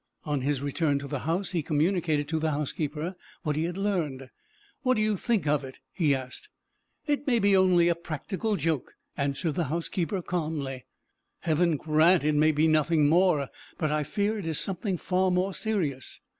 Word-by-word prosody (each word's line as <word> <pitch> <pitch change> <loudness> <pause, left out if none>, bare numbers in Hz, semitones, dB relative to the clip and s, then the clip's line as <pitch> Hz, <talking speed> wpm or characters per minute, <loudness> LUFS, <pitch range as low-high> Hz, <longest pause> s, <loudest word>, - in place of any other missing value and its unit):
On 145 -3 -1
his 140 0 -1
return 145 0 +1
to 140 0 -5
the 145 -1 -3
house 185 +4 0
he 175 -3 0
communicated 155 -1 +1
to 160 0 0
the 160 0 0
housekeeper 150 +3 -3 0.3
what 150 -2 -1
he 155 +2 0
had 175 +1 -4
learned. 155 -10 -2 0.5
"What 255 -3 +2
do 215 - +1
you 215 -1 +2
think 210 - 0
of 145 -1 +1
it?" 130 -1 -9 0.2
he 150 -6 +2
asked. 130 - -7 0.6
"It 290 0 -1
may 245 -3 +3
be 200 -2 +4
only 185 -2 +5
a 170 - +4
practical 175 +6 -3
joke," 160 -5 -2 0.2
answered 140 +3 -1
the 170 +2 -1
housekeeper 170 +4 -2
calmly. 150 -7 -3 0.6
"Heaven 165 0 +2
grant 155 +4 +4
it 155 0 +2
may 155 +1 +4
be 155 +1 +2
nothing 155 -1 +3
more! 160 -4 +3 0.3
But 155 -2 0
I 150 0 +1
fear 205 +8 -1
it 190 - -5
is 160 -2 0
something 190 0 0
far 185 +2 +1
more 185 +2 +1
serious." 170 - -2
160 Hz, 185 wpm, -27 LUFS, 145-185 Hz, 0.6 s, only